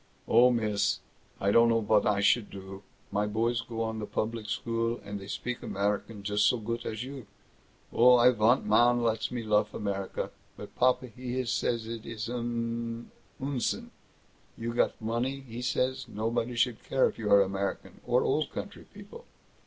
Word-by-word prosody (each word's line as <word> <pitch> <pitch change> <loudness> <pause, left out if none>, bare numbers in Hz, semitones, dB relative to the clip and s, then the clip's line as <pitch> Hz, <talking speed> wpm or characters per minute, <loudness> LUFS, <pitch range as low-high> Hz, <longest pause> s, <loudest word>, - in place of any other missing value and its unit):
"Oh, 125 +1 +6
miss, 105 -4 +1 0.4
I 100 - +2
don't 115 +2 +6
know 115 0 +3
vot 105 -1 +2
I 100 -1 +2
should 105 +1 +3
do. 95 0 -9 0.3
My 105 +1 0
boys 115 +2 0
go 115 -1 -4
on 110 0 -3
the 105 - -4
public 110 -1 -3
school, 115 0 -1
and 100 0 -5
they 95 - -10
speak 125 +4 -4
American 100 +1 -2
just 105 +1 +2
so 125 - +3
goot 115 +1 -4
as 110 +1 -4
you. 130 -4 -8 0.7
Oh, 125 +1 +7
I 120 +1 +6
vant 115 +2 +3
man 120 +3 +4
lets 115 -1 0
me 120 -2 -4
luff 105 -1 +1
America. 100 -2 -3 0.3
But - - -10
papa 125 0 +3
he 125 +2 -4
says 115 -1 -1
it 115 -1 -6
is 115 0 -5
an 115 -1 -3 0.3
Unsinn; 135 -2 -2 0.7
you 115 +1 -3
got 120 - +1
the 110 - -10
money, 125 +5 -1
he 120 -2 -8
says, 130 +1 -1
nobody 115 +3 -2
should 120 -1 0
care 135 - +2
if - - -7
you 105 -2 -2
are 100 0 +8
American 95 +1 -4
or - - +3
Old - - +1
Country - - -7
people. - - -12
115 Hz, 175 wpm, -29 LUFS, 105-120 Hz, 0.7 s, are